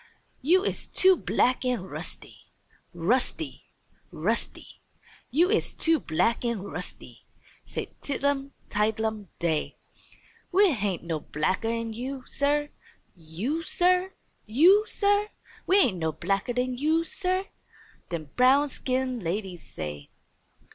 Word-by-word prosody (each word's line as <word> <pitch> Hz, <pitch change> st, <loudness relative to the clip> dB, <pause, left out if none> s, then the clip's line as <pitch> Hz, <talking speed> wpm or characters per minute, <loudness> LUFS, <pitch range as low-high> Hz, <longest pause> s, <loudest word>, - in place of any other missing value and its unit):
"You 355 Hz, +8 st, +4 dB
is -, -, -2 dB
too 375 Hz, 0 st, +5 dB
black 255 Hz, -6 st, +1 dB
an' 250 Hz, -6 st, 0 dB
rusty! 190 Hz, -, -8 dB, 0.4 s
Rusty! 250 Hz, -, -1 dB, 0.5 s
Rusty! -, -, -2 dB, 0.5 s
You 340 Hz, -, +3 dB
is 440 Hz, -, +1 dB
too 325 Hz, -1 st, +3 dB
black 230 Hz, +10 st, +1 dB
an' 235 Hz, -5 st, -1 dB
rusty!" 200 Hz, -, -7 dB, 0.4 s
said -, -, -4 dB
Tidlum 280 Hz, -1 st, -1 dB, 0.2 s
Tidelum 220 Hz, 0 st, -1 dB
Day. 160 Hz, -3 st, -1 dB, 0.7 s
"We 385 Hz, 0 st, +5 dB
hain't 200 Hz, -, -1 dB
no 165 Hz, -2 st, -2 dB
blacker 160 Hz, +10 st, -1 dB
'an 230 Hz, -1 st, -2 dB
you, 255 Hz, +3 st, -5 dB
Sir! 295 Hz, +1 st, +1 dB, 0.5 s
You, 180 Hz, -, -3 dB
Sir! 365 Hz, +3 st, +2 dB, 0.3 s
You, 355 Hz, -, +6 dB
Sir! 410 Hz, +1 st, +2 dB, 0.4 s
We 385 Hz, +2 st, +6 dB
hain't 195 Hz, -, +2 dB
no 160 Hz, -1 st, 0 dB
blacker 195 Hz, +8 st, -1 dB
'an 250 Hz, 0 st, -1 dB
you, 315 Hz, +3 st, +2 dB
Sir!" 370 Hz, +2 st, -1 dB, 0.6 s
dem 155 Hz, -4 st, -5 dB
brown 270 Hz, +3 st, +5 dB
skin 255 Hz, -1 st, -1 dB
ladies 180 Hz, -1 st, -3 dB
say. 75 Hz, -, -7 dB
250 Hz, 120 wpm, -27 LUFS, 195-320 Hz, 0.7 s, You